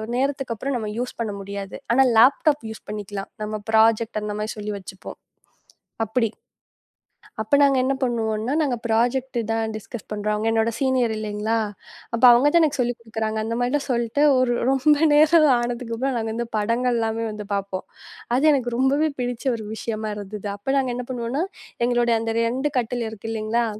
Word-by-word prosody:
நேரத்துக்கு 270 -1 -1
அப்புறம் 275 +5 -3
நாம 220 -3 -3
யூஸ் 245 +1 -3
பண்ண 220 -3 -2
முடியாது. 200 0 -6 0.2
ஆனா 260 - +5 0.2
லேப்டாப் 280 +4 +4
யூஸ் 220 - -8
பண்ணிக்கலாம். 205 -1 -5
நம்ம 215 0 -3
ப்ராஜெக்ட் 220 0 +3
அந்த 210 0 -3
மாதிரி 215 +1 -3
சொல்லி 210 0 -4
வச்சுப்போம், 190 -1 -10 0.9
அப்படி. 225 +1 0 1.1
அப்ப 250 +6 +2
நாங்க 275 -1 +4
என்ன 270 +1 +1
பண்ணுவோம்னா, 225 0 -1
நாங்க 265 -5 0
ப்ராஜெக்ட் 245 +3 +1
தான் 225 -1 -1
டிஸ்கஸ் 215 +1 -8
பண்றோம். 210 0 -1
அவங்க 215 +1 -1
என்னோட 225 +1 +2
சீனியர் 260 -4 +1
இல்லீங்களா? 215 +1 -1 0.6
அப்ப 230 +2 -2
அவங்க 240 +4 +5
தான் 340 - +6
எனக்குச் 290 -4 +2
சொல்லிக் 245 -1 -1
கொடுக்கிறாங்க. 220 -1 -3
அந்த 230 +1 -2
மாதிரி 270 +4 +1
சொல்ட்டு, 240 +3 +1 0.2
ஒரு 255 -1 +2 0.2
ரொம்ப 285 +2 +4 0.2
நேரம் 310 +1 +6
ஆனதுக்கு 240 -1 -3
அப்புறம் 265 +1 -1
நாங்க 220 0 -3
அந்தப் 235 0 -4
படங்கள் 235 +3 +1
எல்லாமே 225 0 -1
வந்து 210 -1 -7
பார்ப்போம். 195 -1 -4 0.5
அது 270 - +1
எனக்கு 245 -3 0
ரொம்பவே 280 +4 +2
பிடிச்ச 245 +1 -4
ஒரு 220 - -7
விஷயமா 220 -1 -4
இருந்தது. 205 0 -6
அப்ப 270 +7 -2
நாங்க 260 -2 -1
என்ன 250 -1 -4
பண்ணுவோம்னா, 245 +6 -2 0.4
எங்களோட 240 -1 +2
அந்த 225 0 -2
2 255 +5 0
கட்டில் 240 0 -2
இருக்கு 220 +1 -8
இல்லீங்களா? 225 +2 0
230 Hz, 170 wpm, -23 LUFS, 215-255 Hz, 1.1 s, தான்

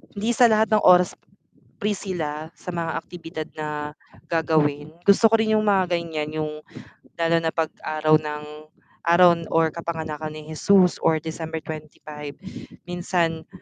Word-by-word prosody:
hindi 220 +4 0
sa 240 +1 +5
lahat 220 0 +2
ng 215 - +3
oras 180 0 +5 0.6
free 210 -1 0
sila, 160 -5 -5
sa - - -16
mga 165 -1 -2
aktibidad 165 -3 -8
na 150 -1 -5 0.3
gagawin. 155 -2 +1
Gusto 200 +4 +5
ko 225 - +5
rin 220 -1 +2
'yung 215 - +1
mga 190 -4 +2
ganiyan, 160 -3 -4
'yung 155 -1 -2 0.6
lalo 165 0 +2
na 165 -1 -2
'pag 160 -1 0 0.2
araw 155 0 +3
ng 150 -1 -5 0.6
araw 175 +1 +7 0.2
or 160 -1 +2
kapanganakan 155 -2 -5
ni 155 - -8
Hesus 185 +3 +3
or 160 -1 +1
December 160 0 -5
twenty-five, 150 -1 -8 0.5
minsan 175 -2 -2
165 Hz, 145 wpm, -23 LUFS, 155-180 Hz, 0.6 s, araw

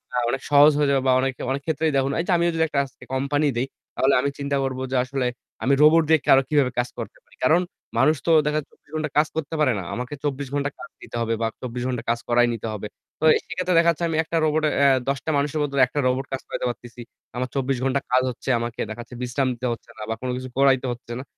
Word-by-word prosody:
আ - - +1
অনেক 135 +2 -2
সহজ 145 +1 +8
হয়ে 145 -1 +2
যাবে 135 -1 +2
বা - - +5
অনেক 135 0 0 0.2
অনেক 140 +1 -2
ক্ষেত্রেই 160 0 0
দেখুন 135 +1 +1
এই - - +1
যে - - +1
আমি 170 - +1
যদি 160 - +2
একটা 145 -2 -1
আজকে 135 - -16
কোম্পানি 145 +3 +1
দেই, 130 +3 0 0.3
তাহলে 135 +1 +3
আমি 140 - 0
চিন্তা 140 0 -1
করব 130 -1 -3
যে - - 0
আসলে 130 0 -2 0.4
আমি 140 - +3
রোবট 160 +2 +6
দিয়ে 160 -1 +5
কারো 135 - +7
কিভাবে 140 -4 +3
কাজ 120 - 0
করতে - - -7
পারি। - - -24
কারণ 160 +7 +4 0.4
মানুষ 150 +6 +4
তো - - +4
দেখা 150 0 +1
যাচ্ছে 145 - -11
২৪ - - -33
ঘন্টা 155 -1 -1
কাজ 150 +1 +5
করতে 160 0 -3
পারে 130 -5 +3
না। - - -5
আমাকে 125 +4 -5
২৪ 140 -1 -2
ঘন্টা 145 0 0
কাজ 125 - -9
দিতে - - -10
হবে 115 0 0
বা 115 - +2
২৪ 125 -1 -4
ঘন্টা 125 -2 -3
কাজ 120 0 +1
করাই 120 0 +4
নিতে 115 0 -5
হবে। 105 0 -5 0.3
তো - - -7
এ - - +4
সেক্ষেত্রে 185 -1 -1
দেখাচ্ছে 170 0 +2
আমি 160 - -1
একটা 165 +1 -2
রোবটে 155 0 +2 0.2
আ - - +7 0.2
১০ 140 - +1
টা - - -2
মানুষের 145 +2 0
বদলে 140 -2 0
একটা 145 - -3
রোবট 130 +1 0
কাজ 130 - -3
করাইতে - - -3
পারতেছি। 120 0 -8 0.3
আমার 125 0 -2
২৪ 135 -1 0
ঘন্টা 135 +1 +1
কাজ 130 0 +4
হচ্ছে 125 - -7
আমাকে 120 0 -5
দেখাচ্ছে 120 +2 -8
বিশ্রাম 130 +2 0
দিতে 125 +2 -3
হচ্ছে 115 - -12
না - - -9
বা 115 - -1
কোন 130 - -3
কিছু 130 0 -6
করাইতে 135 -2 +4
হচ্ছে 120 0 -8
না। - - -6
135 Hz, 255 wpm, -23 LUFS, 125-150 Hz, 0.4 s, সহজ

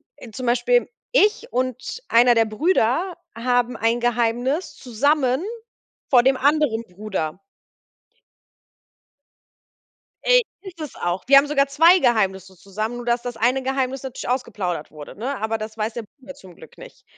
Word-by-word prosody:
äh, 230 - -12
zum 255 +3 -6
Beispiel 250 - +2 0.2
ich 445 0 +2
und 255 - -3
einer 240 +1 +5
der 225 -1 +3
Brüder 320 - 0 0.2
haben 245 +1 0
ein 230 +2 +1
Geheimnis 240 +6 0
zusammen 265 +3 0 0.7
vor 245 -3 +6
dem 265 0 +4
anderen 285 -5 +1
Bruder. 185 -4 -5 2.8
Ey, - - +5 0.2
ist 365 -4 -12
es 300 - -6
auch. 175 +1 -3
Wir 275 +1 +6
haben 285 +1 +2
sogar 280 -1 +2
2 325 +6 +5
Geheimnisse 190 - 0
zusammen, 215 +6 -5
nur 245 - -7
dass 235 0 +1
das 245 -2 -6
eine 250 +4 +1
Geheimnis 265 0 -2
natürlich 265 -1 -6
ausgeplaudert 205 - -3
wurde, 150 -1 -11
ne? 265 +4 -3
Aber 220 0 -1
das 215 +1 -7
weiß 220 +1 -3
der 235 - -4 0.2
Bruder 275 +1 -11
zum 185 -9 -15
Glück - - -16
nicht. - - -14
245 Hz, 150 wpm, -22 LUFS, 220-275 Hz, 2.8 s, vor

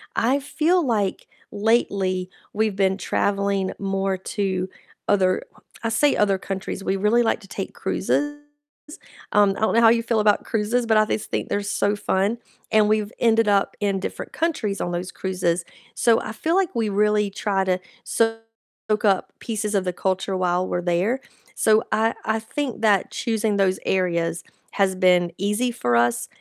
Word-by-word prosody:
I 255 +5 +2
feel 320 +4 +1
like 210 -6 -1 0.2
lately 200 -4 0 0.2
we've 215 -1 0
been 190 -1 +2
traveling 200 -1 0
more 195 -1 -1
to 190 -1 -2 0.4
other 185 -2 +2 0.4
I 230 - 0
say 280 +6 +3
other 200 -2 +2
countries, 195 0 -5
we 195 - 0
really 210 +5 +3
like 225 - +1
to 200 - -14
take - - -6
cruises, 290 0 -1 1.0
um, 205 -2 +5
I - - -7
don't 220 - +2
know - - +5
how 225 - +7
you 230 0 +3
feel 230 -1 +1
about 210 -1 +3
cruises, 225 +3 0
but 220 -1 +4
I 215 - +5
just 210 - -3
think - - -2
they're 205 - 0
so 200 +1 0
fun, 205 +3 0 0.3
and 215 -1 +4
we've 215 -1 +1
ended 225 -1 +3
up 200 -1 +2
in 200 -2 0
different - - -6
countries 245 -12 -1
on 175 - -2
those 180 +1 -4
cruises, 180 -2 -1 0.3
so 230 -2 +3
I 215 - -5
feel 320 +9 -1
like 380 -3 +1
we 225 -2 0
really 210 0 +2
try 195 -1 0
to 185 -1 +1 0.3
soak 225 0 0 0.6
up 195 -2 +1
pieces 215 -2 -3
of 195 - +2
the 180 - -1
culture 190 +2 -1
while 180 0 0
we're 175 - -1
there, 180 +9 +1 0.4
so 220 0 +3
I 220 +1 +2
I 220 +1 0
think 245 +2 -4
that 205 -4 +2
choosing 220 -3 -1
those 190 -1 +2
areas 170 -3 0 0.3
has 195 -2 +2
been 180 -2 +3
easy 210 +6 0
for 120 - 0
us 120 0 +2
205 Hz, 175 wpm, -23 LUFS, 190-225 Hz, 1.0 s, how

